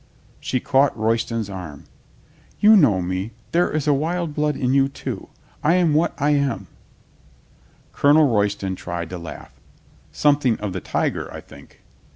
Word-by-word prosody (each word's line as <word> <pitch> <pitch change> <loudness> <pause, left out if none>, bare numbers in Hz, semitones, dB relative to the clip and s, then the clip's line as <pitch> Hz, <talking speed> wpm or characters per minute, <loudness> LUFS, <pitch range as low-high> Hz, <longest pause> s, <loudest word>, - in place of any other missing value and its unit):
She 130 - -2
caught 135 +1 +2
Royston's 115 0 -1
arm. 90 -8 -8 0.8
"You 215 +1 +7
know 110 - +4
me. 95 +5 -3 0.2
There 175 +1 +2
is 155 -1 -2
wild 160 +3 0
blood 150 -1 0
in 125 0 0
you, 135 0 +3
too. 140 - -7 0.3
I 160 +4 +4
am 175 -4 +3
what 155 +3 +1
I 145 +1 +2
am." 140 -9 0 1.3
Colonel 150 +2 +5
Royston 100 -4 0
tried 85 -1 -6
to 90 - -5
laugh. 85 -2 -10 0.6
"Something 145 -5 +2
of 105 -3 -4
the 95 - -4
tiger, - - -2
I - - -7
think." - - -16
135 Hz, 150 wpm, -22 LUFS, 100-150 Hz, 1.3 s, You